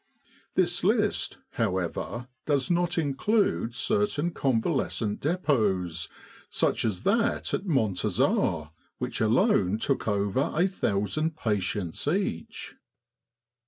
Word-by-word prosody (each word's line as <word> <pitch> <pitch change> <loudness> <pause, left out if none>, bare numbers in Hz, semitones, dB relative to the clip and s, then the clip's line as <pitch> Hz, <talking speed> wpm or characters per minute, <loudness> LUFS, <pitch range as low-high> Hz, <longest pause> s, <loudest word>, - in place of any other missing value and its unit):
This 175 -1 +1
list, 210 +1 +1
however, 110 +3 -2 0.2
does 140 0 +1
not 175 0 +1
include 155 - +1
certain 200 - 0
Convalescent 115 -5 0
Depots, 100 - 0 0.4
such - - 0
as 100 -5 -2
that 230 +3 +1
at 195 - -1
Montazah, 95 - +1 0.3
which - - -3
alone 110 - +3
took 135 +3 -1
over 100 +5 +1
a 170 +4 +4
thousand 155 - -1
patients 100 - -2
each. 170 - -2
130 Hz, 95 wpm, -27 LUFS, -, 0.4 s, a